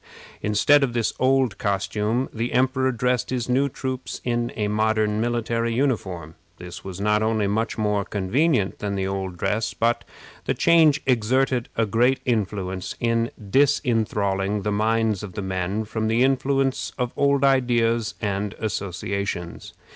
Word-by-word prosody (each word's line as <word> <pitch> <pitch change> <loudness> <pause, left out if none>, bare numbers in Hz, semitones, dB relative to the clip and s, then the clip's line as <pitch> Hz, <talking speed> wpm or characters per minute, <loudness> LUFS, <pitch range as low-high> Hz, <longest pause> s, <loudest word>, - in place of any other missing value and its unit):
Instead 110 +8 +4
of 125 -3 0
this 120 -2 0
old 130 -5 +2
costume 105 +4 -1
the 115 +2 -3
emperor 130 +1 +2
dressed 125 0 0
his 125 -2 -2
new 135 +3 +2
troops 130 -1 -5
in 120 -1 -1
a 105 -2 -1
modern 110 0 +1
military 115 0 -1
uniform. 95 - -1 0.2
This 90 0 -9
was 95 -1 -7
not 105 +1 +2
only 110 -1 +1
much 110 +4 -1
more 105 -2 0
convenient 105 - 0
than 100 -1 -2
the 95 -1 -1
old 95 -2 -3
dress, 110 +5 -1
but 115 +1 +1 0.4
the - - 0
change 160 -3 +4
exerted 130 +1 +1
a 115 - +3
great 120 +5 +2
influence 95 -5 -2
in 115 0 +1 0.2
disenthralling 105 -7 +1
the 105 - -1
minds 110 -1 +1
of 100 -4 -8
the 100 - -4
men 95 +3 -2
from 110 +1 -2
the 115 +3 +3
influence 135 0 +1
of 125 -2 -2
old 140 -1 +2
ideas 120 -4 +2
and 100 -1 -2
associations. 100 -3 -4
115 Hz, 145 wpm, -23 LUFS, 100-125 Hz, 0.4 s, Instead